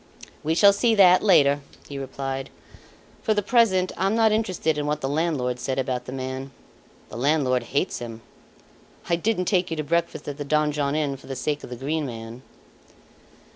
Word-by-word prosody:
"We 160 Hz, +2 st, 0 dB
shall 200 Hz, +3 st, +7 dB
see 225 Hz, +2 st, +2 dB
that, 185 Hz, -3 st, +6 dB
later," 145 Hz, -8 st, +5 dB, 0.3 s
he 140 Hz, -1 st, -6 dB
replied. 135 Hz, 0 st, -5 dB, 0.7 s
"For 215 Hz, -, +1 dB
the 205 Hz, -, 0 dB
present 200 Hz, -5 st, +3 dB
I'm 195 Hz, +3 st, 0 dB
not 225 Hz, -1 st, +4 dB
interested 185 Hz, -7 st, 0 dB
in 145 Hz, -, -2 dB
what 150 Hz, 0 st, -1 dB
the 135 Hz, -, -1 dB
landlord 140 Hz, -5 st, -1 dB
said 130 Hz, +1 st, -3 dB
about 125 Hz, -2 st, -2 dB
the 125 Hz, -, -7 dB
man. 130 Hz, 0 st, -5 dB, 0.6 s
The 110 Hz, -, -8 dB
landlord 130 Hz, -1 st, +2 dB
hates 145 Hz, +7 st, -2 dB
him. 115 Hz, -1 st, -7 dB, 0.9 s
I 170 Hz, -, +4 dB
didn't 185 Hz, +1 st, 0 dB
take 180 Hz, -1 st, +1 dB
you 165 Hz, -, -3 dB
to 155 Hz, -, -1 dB
breakfast 165 Hz, 0 st, -1 dB
at 145 Hz, 0 st, -5 dB
the -, -, -2 dB
Donjon 150 Hz, -1 st, 0 dB
Inn 145 Hz, -3 st, -1 dB
for -, -, -16 dB
the 135 Hz, -, -5 dB
sake 145 Hz, +3 st, -2 dB
of -, -, -8 dB
the 125 Hz, -, -6 dB
Green 145 Hz, +4 st, -2 dB
Man." 115 Hz, 0 st, -8 dB
150 Hz, 185 wpm, -24 LUFS, 135-180 Hz, 0.9 s, shall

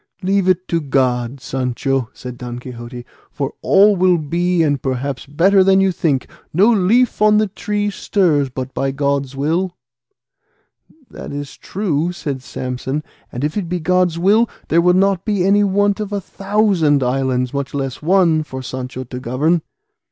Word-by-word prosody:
"Leave 190 Hz, 0 st, +2 dB
it 185 Hz, 0 st, +1 dB
to 165 Hz, -1 st, 0 dB
God, 130 Hz, -2 st, 0 dB
Sancho," 130 Hz, 0 st, -2 dB
said 125 Hz, -1 st, -9 dB
Don 120 Hz, 0 st, -7 dB
Quixote, 120 Hz, 0 st, -9 dB, 0.2 s
"for 140 Hz, -1 st, -4 dB
all 205 Hz, +1 st, +5 dB
will 180 Hz, -1 st, +3 dB
be 170 Hz, +3 st, 0 dB
and 145 Hz, -4 st, 0 dB
perhaps 130 Hz, 0 st, -3 dB
better 185 Hz, +7 st, +4 dB
than 190 Hz, 0 st, +4 dB
you 195 Hz, 0 st, +3 dB
think; 150 Hz, -6 st, -1 dB, 0.2 s
no 200 Hz, +8 st, +4 dB
leaf 220 Hz, +5 st, +2 dB
on 210 Hz, 0 st, +5 dB
the 215 Hz, -, +3 dB
tree 205 Hz, +1 st, -2 dB
stirs 165 Hz, -10 st, +1 dB
but 130 Hz, +1 st, -6 dB
by 135 Hz, -, -1 dB
God's 140 Hz, -1 st, -1 dB
will." 170 Hz, +6 st, -1 dB, 1.3 s
"That -, -, -8 dB
is 145 Hz, -1 st, -6 dB
true," 175 Hz, -4 st, -2 dB
said 145 Hz, -6 st, -5 dB
Samson; 130 Hz, +3 st, -4 dB, 0.3 s
"and 125 Hz, -, -5 dB
if 150 Hz, -, -1 dB
it 195 Hz, -5 st, -3 dB
be 180 Hz, 0 st, -1 dB
God's 180 Hz, 0 st, +1 dB
will, 205 Hz, +6 st, +3 dB, 0.2 s
there 170 Hz, +2 st, +4 dB
will 180 Hz, +1 st, +4 dB
not 195 Hz, -1 st, +2 dB
be 205 Hz, -4 st, 0 dB
any 205 Hz, +1 st, +4 dB
want 205 Hz, +1 st, +1 dB
of 210 Hz, -1 st, -4 dB
a 205 Hz, -, -1 dB
thousand 195 Hz, -8 st, +1 dB
islands, 125 Hz, 0 st, 0 dB
much 140 Hz, 0 st, -3 dB
less 135 Hz, -2 st, -3 dB
one, 170 Hz, -1 st, +3 dB
for 130 Hz, -4 st, -7 dB
Sancho 130 Hz, +1 st, -5 dB
to 125 Hz, 0 st, -7 dB
govern." 145 Hz, +8 st, 0 dB
155 Hz, 165 wpm, -18 LUFS, 135-190 Hz, 1.3 s, all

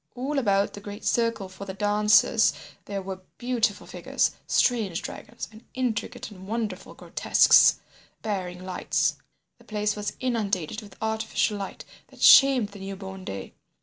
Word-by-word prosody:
All 275 Hz, +3 st, -1 dB
about 200 Hz, -5 st, +1 dB
the -, -, -8 dB
great 205 Hz, +1 st, -9 dB
circle 230 Hz, -4 st, 0 dB
for 185 Hz, +1 st, -10 dB
the 190 Hz, -1 st, -7 dB
dancers 210 Hz, +1 st, +4 dB, 0.3 s
there 200 Hz, -1 st, -4 dB
were 190 Hz, 0 st, -6 dB, 0.2 s
beautiful 240 Hz, -5 st, 0 dB
figures, -, -, -1 dB, 0.2 s
strange 215 Hz, -9 st, +1 dB
dragons, -, -, -7 dB
and 220 Hz, +2 st, -15 dB
intricate 245 Hz, -2 st, -3 dB
and 190 Hz, -1 st, -12 dB
wonderful 215 Hz, -3 st, -4 dB
grotesques -, -, +5 dB, 0.4 s
bearing 185 Hz, -4 st, -4 dB
lights. 185 Hz, -1 st, 0 dB, 0.4 s
The -, -, -19 dB
place 210 Hz, -1 st, -1 dB
was 210 Hz, 0 st, -4 dB
inundated 215 Hz, -7 st, -1 dB
with 205 Hz, -2 st, -14 dB
artificial 220 Hz, -1 st, 0 dB
light 195 Hz, -, -7 dB, 0.2 s
that -, -, -10 dB
shamed 265 Hz, -6 st, +7 dB
the 200 Hz, -, -12 dB
newborn 190 Hz, 0 st, -7 dB
day. 95 Hz, 0 st, -6 dB
205 Hz, 145 wpm, -26 LUFS, 195-225 Hz, 0.4 s, shamed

